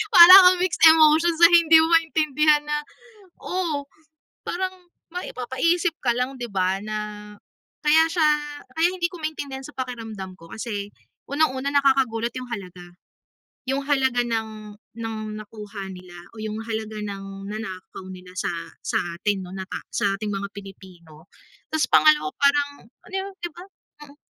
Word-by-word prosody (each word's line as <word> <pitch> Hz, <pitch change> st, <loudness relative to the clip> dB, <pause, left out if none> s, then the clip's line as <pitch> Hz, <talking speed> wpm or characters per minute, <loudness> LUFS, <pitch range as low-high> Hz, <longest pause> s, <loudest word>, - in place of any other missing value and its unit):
Para 345 Hz, +2 st, +11 dB, 0.2 s
bang 365 Hz, -, +1 dB
mixed 365 Hz, -2 st, -1 dB
emotion 320 Hz, +1 st, +5 dB
na 340 Hz, +1 st, +8 dB
hindi 330 Hz, -1 st, +7 dB
mo -, -, +1 dB
maintindihan 305 Hz, -2 st, +3 dB
na, 295 Hz, 0 st, -1 dB, 0.6 s
oh, 330 Hz, -6 st, -2 dB, 0.6 s
parang 370 Hz, +1 st, -2 dB, 0.4 s
maipapaisip 335 Hz, +2 st, -1 dB
ka 240 Hz, -2 st, +1 dB
lang, 255 Hz, +2 st, -2 dB
'di 240 Hz, -, -4 dB
ba, 190 Hz, 0 st, 0 dB
na 215 Hz, 0 st, -4 dB, 0.8 s
kaya 310 Hz, +1 st, +5 dB
siya 325 Hz, -3 st, +3 dB, 0.5 s
kaya 325 Hz, +1 st, +3 dB
hindi 360 Hz, -2 st, -1 dB
ko 355 Hz, 0 st, -11 dB
maintindihan 285 Hz, -4 st, -5 dB
sa 295 Hz, -, -11 dB
pakiramdam 225 Hz, -7 st, -6 dB
ko 165 Hz, -, -14 dB
kasi 210 Hz, -3 st, -5 dB, 0.4 s
unang-una 280 Hz, -2 st, 0 dB
nakakagulat 260 Hz, -4 st, +2 dB
'yung 255 Hz, -, -8 dB
halaga, 185 Hz, -5 st, -7 dB, 0.8 s
'yung 270 Hz, +2 st, -1 dB
halaga 265 Hz, -4 st, +1 dB
ng 220 Hz, -2 st, -5 dB, 0.2 s
ng 225 Hz, -1 st, -5 dB, 0.2 s
nakuha 210 Hz, -2 st, -9 dB
nila, 180 Hz, -1 st, -13 dB, 0.2 s
o -, -, -11 dB
'yung 215 Hz, -1 st, -4 dB
halaga 220 Hz, -1 st, -5 dB
ng 195 Hz, -1 st, -7 dB
nanakaw 190 Hz, -3 st, -8 dB
nila 180 Hz, 0 st, -12 dB
sa -, -, -1 dB, 0.3 s
sa -, -, -4 dB, 0.2 s
atin 200 Hz, -1 st, -1 dB
'no, 180 Hz, -, -11 dB
na 190 Hz, -1 st, -5 dB
ta -, -, -5 dB
sa 200 Hz, -1 st, 0 dB
ating 210 Hz, 0 st, -4 dB
mga 200 Hz, 0 st, -3 dB
Pilipino. 180 Hz, -5 st, -13 dB, 0.4 s
Tas 315 Hz, -1 st, +1 dB
pangalawa 305 Hz, +4 st, +4 dB
parang, 285 Hz, 0 st, +1 dB
ano -, -, -21 dB
yun, 385 Hz, +1 st, -3 dB
'di 345 Hz, -, -2 dB
ba? 350 Hz, -, -11 dB, 0.4 s
Mm. 285 Hz, 0 st, -17 dB
250 Hz, 150 wpm, -23 LUFS, 205-310 Hz, 0.8 s, Para